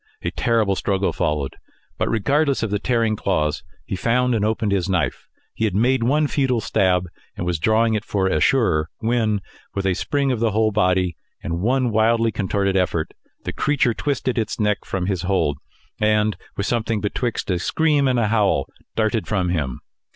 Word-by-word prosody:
A - - -1
terrible 110 -4 +1
struggle 95 0 0
followed; 75 -3 -1 0.4
but - - +1
regardless 140 +5 +1
of 110 - -2
the 105 - 0
tearing 115 -1 +1
claws, 75 -7 0 0.2
he - - -3
found 125 +5 +1
and 110 -3 +1
opened 110 -1 0
his 100 -1 0
knife. 90 -5 -1 0.3
He 110 - -1
had 100 -4 -1
made 125 +4 +2
one 145 +6 +2
futile 135 -4 +1
stab, 95 -5 +1 0.3
and 85 - -3
was 90 -2 -1
drawing 110 +5 +3
it 105 -1 -1
for 100 -3 -1
a 95 -5 +1
surer, 80 - +2
when, 110 -3 0 0.3
with 100 -1 -2
a 95 - +2
spring 140 - 0
of 125 - -1
the 115 0 +2
whole 110 0 +2
body, 90 -5 +1 0.3
and 85 0 -2
one 125 +3 +1
wildly 115 +1 +3
contorted 100 -1 0
effort, 90 -4 0 0.3
the - - -4
creature 140 -5 +1
twisted 130 -2 -1
its 110 0 -3
neck 105 -1 0
from 95 -2 -2
his 95 -3 -1
hold, 90 -7 0 0.4
and 105 0 +2 0.2
with 100 - -1
something 115 -2 0
betwixt 105 +1 -2
a 90 - 0
scream 150 - +2
and 125 -1 +2
a 110 -3 +1
howl, 105 -11 +2 0.3
darted 110 0 0
from 95 -4 0
him. 75 -8 -2
105 Hz, 185 wpm, -22 LUFS, 95-115 Hz, 0.4 s, drawing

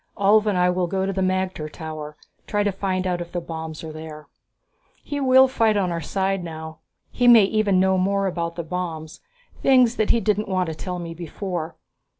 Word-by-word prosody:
Ulv 210 +2 +4
and 200 -3 +1
I 180 0 +3
will 180 0 0
go 190 +2 -1
to 195 - -2
the 190 - -2
magter 185 -4 -1
tower, 155 -2 -7 0.3
try 205 0 0
to 205 - +1
find 190 -1 -2
out 180 -1 -1
if 170 0 -7
the 175 - -2
bombs 160 -2 -7
are 160 - -6
there. 155 -1 -9 0.8
He 290 -1 -4
will 265 -1 +6
fight 225 -5 +2
on 185 -3 0
our 170 -1 -3
side 190 +3 -1
now. 160 -1 -8 0.3
He 245 - +1
may 235 -3 +9
even 200 -1 +2
know 190 0 +3
more 195 +1 +1
about 170 -2 -2
the 170 - -4
bombs, 165 -2 -5 0.4
things 250 -3 +4
that 215 - +1
he 235 - +4
didn't 210 0 0
want 185 -1 +1
to - - -3
tell 180 +3 -5
me 170 -1 -6
before. 170 0 -5
185 Hz, 205 wpm, -23 LUFS, 165-200 Hz, 0.8 s, may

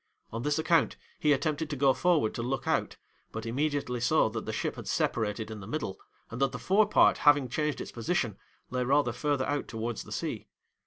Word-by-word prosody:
On 115 - -3
this 145 +3 0
account, 165 +1 +2 0.2
he 150 - +3
attempted 155 +2 0
to 145 - -2
go 135 0 +4
forward 165 -11 +2
to - - -4
look 125 +2 -2
out, - - 0 0.3
but 110 0 -5
immediately 140 0 -1
saw 125 0 +3
that 110 0 -5
the - - -1
ship - - -2
had - - -8
separated 110 0 -1
in 110 - -6
the 95 - -9
middle, 110 -7 -4 0.3
and 120 +3 -5
that 135 -1 +2
the - - -3
forepart 205 - +4
having 145 -3 +5
changed 150 +4 -1
its - - -6
position, 115 - -1 0.4
lay 125 0 0
rather 135 0 +3
further 140 +2 0
out 145 -1 -2
towards 115 0 -4
the - - -13
sea. - - -4
135 Hz, 205 wpm, -29 LUFS, 115-150 Hz, 0.4 s, having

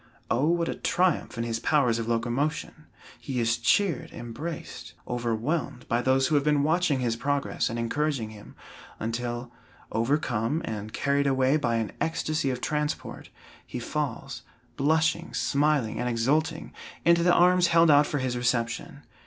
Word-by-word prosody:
O 130 +5 +2
what 170 0 +1
a - - -1
triumph 180 -8 0
in 115 - -1
his 115 -1 -2
powers 125 -7 +2
of 115 - -3
locomotion! 125 +7 -2 0.3
He 130 -3 -3
is 115 0 +1
cheered, 170 +6 +1
embraced, 140 +8 -7
overwhelmed, 120 +3 -2
by 120 +1 +1
those 130 +1 +3
who 155 - 0
have 145 -2 +3
been 150 -1 +2
watching 155 -3 +2
his 120 -2 0
progress 140 +4 -1
and 115 - -4
encouraging 120 -1 -1
him, 105 -1 -13 0.4
until, 120 +2 -3 0.4
overcome 120 +3 0
and 105 0 -5
carried 140 +2 +1
away 135 +1 +3
by 120 -6 +1
an 110 -2 -1
extasy 155 -3 0
of 125 -1 -3
transport, 150 0 -3 0.3
he - - -7
falls, 135 0 -4 0.3
blushing, 160 +3 +1
smiling 145 -5 +1
and 125 - -1
exulting 135 +7 0 0.3
into 170 0 +5
the 175 +1 +4
arms 180 +1 +5
held 165 -1 +5
out 145 0 +6
for 145 - -2
his 130 -2 -1
reception. 120 -1 -2
135 Hz, 155 wpm, -27 LUFS, 115-150 Hz, 0.4 s, out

